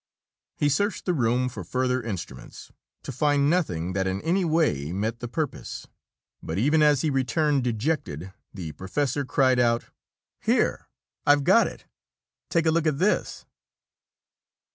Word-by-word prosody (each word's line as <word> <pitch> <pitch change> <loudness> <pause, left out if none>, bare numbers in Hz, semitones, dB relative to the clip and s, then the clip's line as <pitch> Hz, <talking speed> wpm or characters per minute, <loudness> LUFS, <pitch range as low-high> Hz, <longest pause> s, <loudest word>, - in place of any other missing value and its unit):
He 145 - +2
searched 200 +8 0
the 180 - +1
room 125 -3 +1
for 110 -6 -6
further 125 +6 0
instruments 95 - -7 0.3
to - - -5
find 145 -1 +2
nothing 95 - -1
that 95 0 0
in 95 +1 -1
any 185 +4 +1
way 155 - +1
met 110 +5 -2
the 120 - -5
purpose. 150 +4 -4 0.6
But 80 - -4
even 150 +9 +3
as 150 -3 +4
he 155 - 0
returned 135 +2 +1
dejected, 110 - -2 0.2
the 85 -6 -6
professor 130 - -2
cried 130 -1 +2
out: 115 -1 +1 0.5
"Here - - +1 0.4
I've 145 0 +5
got - - +5
it! - - -10 0.6
Take 165 -1 +1
a 160 - +4
look 165 0 +1
at 150 -3 +1
this!" 195 +7 0
130 Hz, 145 wpm, -25 LUFS, 105-150 Hz, 0.6 s, I've